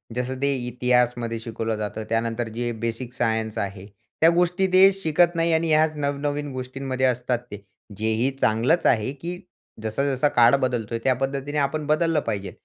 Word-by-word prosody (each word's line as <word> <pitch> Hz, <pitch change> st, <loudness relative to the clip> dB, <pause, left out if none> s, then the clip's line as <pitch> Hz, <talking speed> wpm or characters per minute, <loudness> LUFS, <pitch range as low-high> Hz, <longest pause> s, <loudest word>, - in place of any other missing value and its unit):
जसं 125 Hz, +1 st, -2 dB
ते 140 Hz, 0 st, +2 dB
इतिहासामध्ये 125 Hz, -1 st, 0 dB
शिकवलं 115 Hz, 0 st, -3 dB
जातं. 105 Hz, +1 st, -4 dB
त्यानंतर 115 Hz, +1 st, -1 dB
जे 120 Hz, 0 st, -2 dB
बेसिक 115 Hz, +2 st, -4 dB
सायन्स 110 Hz, -2 st, -1 dB
आहे, 100 Hz, -1 st, -4 dB, 0.4 s
त्या 165 Hz, -, +7 dB
गोष्टी 180 Hz, +2 st, +2 dB
ते 190 Hz, +1 st, +8 dB
शिकत 175 Hz, -2 st, +2 dB
नाही 165 Hz, 0 st, +1 dB
आणि 160 Hz, +1 st, +1 dB
ह्याच 155 Hz, 0 st, +3 dB
नव-नवीन 145 Hz, 0 st, -2 dB
गोष्टींमध्ये 130 Hz, 0 st, -3 dB
असतात 125 Hz, -1 st, 0 dB
ते. 105 Hz, 0 st, -8 dB, 0.3 s
जे 110 Hz, +2 st, -2 dB
ही 120 Hz, +4 st, +1 dB
चांगलंच 120 Hz, +10 st, +2 dB
आहे 110 Hz, +1 st, +2 dB
की 175 Hz, +1 st, -5 dB, 0.4 s
जसा 110 Hz, +5 st, -1 dB
जसा 140 Hz, +3 st, +2 dB
काळ 120 Hz, 0 st, +5 dB
बदलतोय 115 Hz, -2 st, -1 dB
त्या 130 Hz, -, +3 dB
पद्धतीने 135 Hz, +3 st, -3 dB
आपण 145 Hz, +1 st, 0 dB
बदललं 160 Hz, +1 st, +2 dB
पाहिजे. 100 Hz, -7 st, -4 dB
130 Hz, 165 wpm, -24 LUFS, 115-150 Hz, 0.4 s, ते